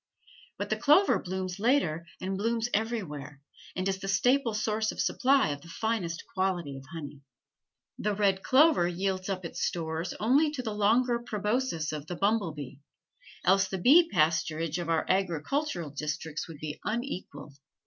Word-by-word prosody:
But - - -4
the - - +1
clover 310 +7 +5
blooms 185 0 -4
later 185 - +1
and 190 +1 -3
blooms 230 +3 0
everywhere, 160 - -3 0.4
and 185 +1 -1
is 190 -1 -1
the 195 - -6
staple 245 +4 +2
source 215 0 0
of - - -10
supply 270 - +3
of 145 -1 -4
the 170 - -14
finest 175 -2 -2
quality 180 -7 -1
of 135 0 -10
honey. 145 -4 -8 0.8
The 210 0 0
red 195 -2 +2
clover 275 - +5
yields 185 +2 -2
up 185 -2 -3
its - - -6
stores 165 +1 -2
only 270 +8 +4
to 255 -4 -4
the 220 -3 -3
longer 235 +4 +2
proboscis 210 -6 -1
of 150 -1 -6
the 175 - -4
bumble 200 -2 +1
bee, 140 -3 -8 0.7
else 190 +1 +4
the 190 - -3
bee 315 - +6
pasturage 160 0 +1
of 170 -1 -4
our 165 -1 +1
agricultural 180 - -1
districts 150 +1 -4
would 165 -3 -9
be 150 0 -6
unequaled. 185 - -5
190 Hz, 160 wpm, -29 LUFS, 165-225 Hz, 0.8 s, bee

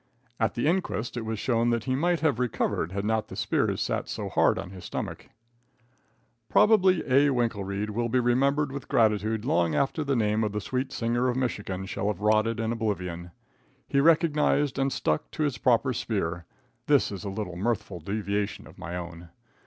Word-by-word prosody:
At 110 - +1
the 120 - -1
inquest 160 - 0
it 120 -2 -4
was 110 0 -3
shown 120 +1 +1
that 115 -2 0
he 130 - -1
might 170 +5 +1
have 145 -7 +1
recovered, 115 -8 -1
had 100 +1 -3
not 110 0 0
the - - -9
spears - - 0
sat - - -2
so - - -4
hard - - +3
on 90 - -6
his 95 -2 -10
stomach. - - -5 1.2
Probably 190 -4 +4
A. 140 +2 +4
Winkelreid 105 -5 -1
will 120 +2 -1
be 125 - +2
remembered 135 +4 +2
with 140 0 -6
gratitude 110 0 +1
long 85 -7 +2
after 140 +3 0
the 140 -1 0
name 110 -1 +1
of 105 -1 -1
the 105 - -1
Sweet 130 +5 -3
Singer 120 +1 0
of 125 - 0
Michigan 105 -7 -2
shall 95 - -3
have 105 -4 -1
rotted 110 +2 +2
in 115 0 -1
oblivion. 90 -7 -3 0.6
He 140 - +1
recognized 150 -3 +3
and 135 0 +1
stuck 75 - -1
to 155 - -1
his 145 -4 -1
proper 125 +1 +3
spear. 85 -8 -2 0.4
(This - - +3
is 100 - -6
a 100 - -3
little 95 -3 -4
mirthful 100 -2 -2
deviation 100 +3 -2
of - - -15
my 85 +3 -5
own.) 85 -1 -8
115 Hz, 185 wpm, -27 LUFS, 100-135 Hz, 1.2 s, Probably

